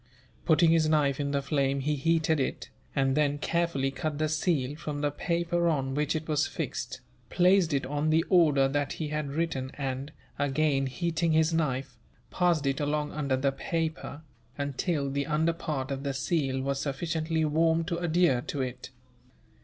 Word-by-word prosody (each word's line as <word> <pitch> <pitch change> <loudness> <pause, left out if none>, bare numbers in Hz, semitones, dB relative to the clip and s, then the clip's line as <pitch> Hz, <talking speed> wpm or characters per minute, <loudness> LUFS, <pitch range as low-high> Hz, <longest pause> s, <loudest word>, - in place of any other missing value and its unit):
Putting 165 0 +5
his 160 -2 +3
knife 145 -3 +2
in 140 -1 -1
the 140 -1 -1
flame 140 -1 0
he 150 +3 0
heated 160 +2 +1
it, 135 - -3 0.2
and 135 -1 +2
then 145 -1 +2
carefully 165 -4 0
cut 155 +1 -3
the 155 0 0
seal 150 -3 0
from 150 -2 -5
the 145 -1 +1
paper 170 +2 0
on 135 -4 -1
which 150 +2 0
it 155 0 -3
was 150 -1 +1
fixed, - - -5 0.3
placed 180 -1 +4
it 140 -2 0
on 145 +3 -1
the 160 +1 +3
order 150 -7 +4
that 145 +1 -1
he 155 -2 -4
had 150 -1 -2
written 140 -3 -2
and, 135 0 -4 0.3
again 145 -1 +1
heating 165 +3 0
his 160 +1 +3
knife, 135 -4 -1 0.3
passed 175 -5 +2
it 135 -1 0
along 150 0 -1
under 140 -3 -1
the 135 +1 +1
paper, 160 0 -3 0.3
until 145 +1 -1
the 140 0 -2
under 160 +2 +1
part 140 -5 -4
of 135 0 -3
the 140 -1 -3
seal 135 -2 0
was 135 0 -1
sufficiently 160 +2 -1
warmed 160 +2 +2
to 170 -2 -2
adhere 170 -6 +2
to 140 - -5
it. 125 0 -6
150 Hz, 175 wpm, -28 LUFS, 140-160 Hz, 0.3 s, Putting